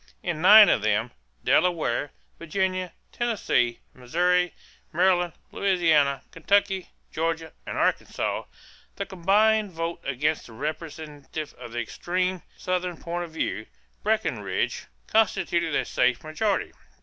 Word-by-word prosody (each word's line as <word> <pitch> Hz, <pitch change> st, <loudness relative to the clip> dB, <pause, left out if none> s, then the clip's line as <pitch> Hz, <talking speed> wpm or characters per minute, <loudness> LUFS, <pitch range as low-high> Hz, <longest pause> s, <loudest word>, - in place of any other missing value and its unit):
In 170 Hz, -3 st, -2 dB
nine 210 Hz, +3 st, +10 dB
of -, -, +3 dB
them 110 Hz, +3 st, +1 dB, 0.3 s
Delaware, 160 Hz, -6 st, +2 dB, 0.3 s
Virginia, 185 Hz, +2 st, -1 dB, 0.2 s
Tennessee, 210 Hz, -, 0 dB
Missouri, 180 Hz, +8 st, +1 dB, 0.4 s
Maryland, 175 Hz, 0 st, +2 dB, 0.2 s
Louisiana, 165 Hz, -8 st, +2 dB
Kentucky, 195 Hz, +2 st, +1 dB, 0.2 s
Georgia, 165 Hz, 0 st, -2 dB
and -, -, -4 dB
Arkansas -, -, 0 dB, 0.5 s
the -, -, -3 dB
combined 210 Hz, +3 st, +2 dB
vote 165 Hz, +1 st, -4 dB
against 145 Hz, +3 st, -1 dB
the 115 Hz, -, -13 dB
representative 155 Hz, +1 st, -6 dB
of 120 Hz, -2 st, -11 dB
the 120 Hz, -, -2 dB
extreme 180 Hz, +9 st, -2 dB, 0.2 s
Southern 180 Hz, -1 st, -2 dB
point 175 Hz, +2 st, -4 dB
of -, -, -11 dB
view, 110 Hz, -, -3 dB, 0.3 s
Breckinridge, 220 Hz, +1 st, -1 dB, 0.2 s
constituted 175 Hz, -7 st, +1 dB
a -, -, +1 dB
safe 125 Hz, -2 st, +1 dB
majority. 190 Hz, +6 st, -1 dB
170 Hz, 115 wpm, -26 LUFS, 150-185 Hz, 0.5 s, nine